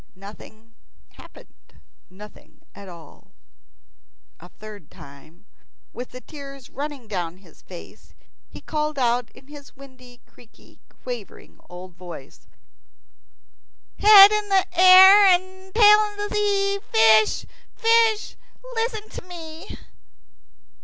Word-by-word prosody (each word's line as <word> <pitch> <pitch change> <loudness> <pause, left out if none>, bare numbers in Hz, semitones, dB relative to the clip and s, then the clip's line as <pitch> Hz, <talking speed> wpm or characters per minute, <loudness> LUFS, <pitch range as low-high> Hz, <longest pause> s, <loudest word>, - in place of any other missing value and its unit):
Nothing 215 +3 -16 0.4
happened, - - -20 0.3
nothing 210 +3 -17
at 200 -1 -13
all. 170 -4 -17 1.1
A 175 - -16
third 210 -6 -14
time, 155 +4 -18 0.5
with 245 - -9
the 255 - -13
tears 275 -3 -13
running 280 -4 -8
down 180 -4 -6
his 180 -5 -22
face, 180 -2 -15 0.3
he - - -14
called 305 -1 -5
out 245 -2 -1
in 265 - -18
his 290 0 -15
windy, 255 -3 -17
creaky, 235 -2 -23
quavering 240 -6 -11
old 180 +1 -12
voice, 170 -6 -14 1.5
"Head 410 -1 +8
in 425 -1 -3 0.2
air 375 +3 +7
and 375 +1 -1
tail 420 -1 +4
in 415 0 -5
sea, 400 -1 -1
Fish, 220 - +2 0.3
fish, 455 -2 0 0.4
listen 450 -2 -4
to - - -11
me." 335 0 -12
275 Hz, 105 wpm, -21 LUFS, -, 1.5 s, Head